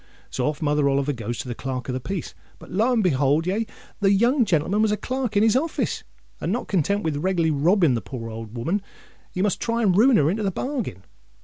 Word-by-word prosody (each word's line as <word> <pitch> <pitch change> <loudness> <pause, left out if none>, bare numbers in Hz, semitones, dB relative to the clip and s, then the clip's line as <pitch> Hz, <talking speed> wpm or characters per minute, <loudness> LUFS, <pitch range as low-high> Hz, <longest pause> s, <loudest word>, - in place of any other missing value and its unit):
So 125 - -1
off 150 +2 -3
Mother 145 -1 +2
Oliver 140 +1 +1
goes 120 -1 -4
to - - -5
the 120 - -3
Clerk 130 0 -5
of 130 - -2
the 130 - -2
Peace: 190 +8 -5 0.2
but, - - -14
lo 220 +7 +2
and 230 -3 +2
behold 145 -1 +2
ye! 210 +5 -1 0.3
the 195 -1 +3
young 240 +6 +3
gentleman 185 +3 +1
was 220 -1 +3
a 210 - +1
clerk 255 -4 -2
in 205 - +5
his 225 0 +4
office; 310 +5 -1 0.4
and 175 - -2
not 240 - -2
content 200 +3 +1
with 155 -3 -1
reglarly 170 0 +1
robbing 165 +1 +3
the 115 - -1
poor 115 +1 -7
old 110 +1 -8
o'oman, 170 - -1 0.5
he 185 - -1
must 205 - 0
try 235 0 0
and 190 -4 +3
ruin 240 +4 +6
her 145 - +3
into 215 +4 -2
the 200 - +1
bargain. 225 - -4
180 Hz, 230 wpm, -24 LUFS, 140-210 Hz, 0.5 s, ruin